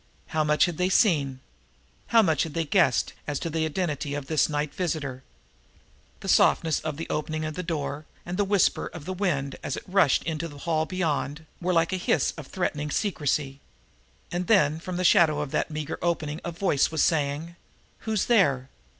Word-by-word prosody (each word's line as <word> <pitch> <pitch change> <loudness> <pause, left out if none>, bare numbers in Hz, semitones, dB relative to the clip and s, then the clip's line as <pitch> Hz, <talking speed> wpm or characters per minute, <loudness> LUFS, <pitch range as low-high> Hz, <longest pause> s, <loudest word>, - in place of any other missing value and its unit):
How 155 -1 +1
much 150 +2 +4
had 175 -2 -4
they 180 +1 +2
seen? 145 - +2 0.7
How 230 -1 +5
much 160 -7 +2
had 160 -3 -3
they 165 -1 0
guessed 180 +4 +2
as 145 -2 -1
to 165 - -4
the 160 0 0
identity 150 -3 -2
of 145 -2 -4
this 155 +2 +2
night 150 -1 -2
visitor? 150 -7 -3 1.0
The - - -7
softness 160 -2 +4
of 155 -2 -4
the 165 - -5
opening 155 +1 -2
of 155 - -3
the 180 - -4
door 155 -3 -4 0.2
and 175 - -4
the 205 - +2
whisper 200 -2 +2
of 165 -4 -9
the 185 - -3
wind, 150 -8 -1
as 135 - -3
it - - -7
rushed 185 -7 +3
into 165 0 -3
the 145 -3 -11
hall 160 +1 -1
beyond, 160 -4 -2 0.2
were 180 +1 0
like 165 +1 +2
a - - +1
hiss 180 - +1
of 150 -4 -9
threatening 150 -5 -2
secrecy. 145 -7 -1 0.7
And 175 +1 -2
then, 160 -8 +4
from 180 +1 -5
the 185 - -1
shadow 160 -3 +5
of 150 -2 -3
that - - 0
meager 155 0 -4
opening 160 -2 -1
a 175 - -3
voice 170 -4 +1
was 160 -1 +1
saying: 155 +1 0 0.4
"Who's 220 -3 -1
there?" 140 - +3
160 Hz, 195 wpm, -26 LUFS, 145-180 Hz, 1.0 s, How